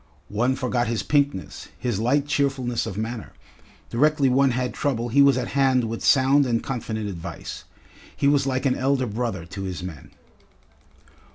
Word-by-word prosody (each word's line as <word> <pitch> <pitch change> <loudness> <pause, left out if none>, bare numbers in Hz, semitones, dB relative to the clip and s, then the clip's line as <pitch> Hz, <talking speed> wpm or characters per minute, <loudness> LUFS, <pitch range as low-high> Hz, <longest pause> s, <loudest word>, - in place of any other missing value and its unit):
One 120 +5 +1
forgot 125 -2 -1
his 115 -1 -1
pinkness, 140 -9 -1
his 120 -6 -2
light 135 +6 +2
cheerfulness 135 -4 0
of 95 - -6
manner. 110 +1 -5 0.6
Directly 145 +2 +3
one 135 +2 +4
had 125 0 -1
trouble 120 -4 -1
he 140 +5 +4
was 140 -2 +5
at 125 - -2
hand 135 -2 +2
with 115 0 -4
sound 135 +1 +4
and 115 -2 0
confident 110 -4 -3
advice. 85 -4 -7 0.5
He 140 - +2
was 140 -1 +3
like 130 +1 -1
an 130 - +3
elder 130 0 +1
brother 110 -5 -3
to 95 +3 -8
his 95 -2 -5
men. 80 -7 -8
125 Hz, 165 wpm, -24 LUFS, 110-135 Hz, 0.6 s, was